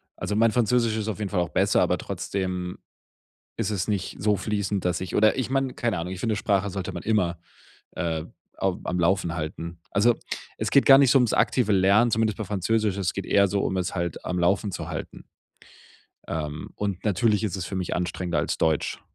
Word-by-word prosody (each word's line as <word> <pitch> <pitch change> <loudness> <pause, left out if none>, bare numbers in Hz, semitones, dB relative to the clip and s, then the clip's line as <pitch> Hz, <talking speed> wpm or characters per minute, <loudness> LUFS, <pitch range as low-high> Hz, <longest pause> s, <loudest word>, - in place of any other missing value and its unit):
Also 105 - -3
mein 115 +1 +4
Französisch 115 -1 +2
ist 110 -1 -3
auf 110 -2 -3
jeden 105 -2 -2
Fall 95 - 0
auch 85 -1 0
besser, - - +2
aber - - +2
trotzdem 90 -2 -4 0.8
ist 115 -3 -1
es 100 -3 -2
nicht 100 -3 -2
so 105 0 +2
fließend, 100 -1 -2
dass 90 0 0
ich 95 - -4
oder 110 +4 +4
ich 130 -1 -1
meine, 135 -1 0
keine 115 -5 -1
Ahnung, 90 +3 -4
ich 90 - -7
finde 110 -1 0
Sprache 100 -1 +1
sollte 95 -1 -4
man - - -7
immer, 90 -6 +1 0.5
äh, 80 -3 -2 0.3
au 95 -2 0
am 90 - -2
Laufen 85 -1 +1
halten. 85 +1 -5
Also 115 +4 +4 0.4
es - - -2
geht 140 - +5
gar 135 0 +9
nicht 135 -3 +5
so 135 - +6
ums 120 -3 +2
aktive 120 -5 +2
Lernen, 100 +5 +4
zumindest 110 -1 +1
bei 110 - -3
Französisch. 105 +1 0
Es 95 -3 -1
geht 100 - -4
eher 100 0 +4
so, 100 +1 0
um 95 - -1
es 90 +1 -2
halt 85 -2 -3
am 90 0 -1
Laufen 100 +3 +1
zu - - -5
halten. - - -7 1.0
Ähm, 75 -2 -4
und 100 -3 -3
natürlich 105 +1 +2
ist 100 -4 -2
es 95 - -4
für 95 - -5
mich 90 -1 -2
anstrengender 90 -1 -2
als - - -1
Deutsch 80 -2 0
100 Hz, 210 wpm, -25 LUFS, 90-110 Hz, 1.0 s, gar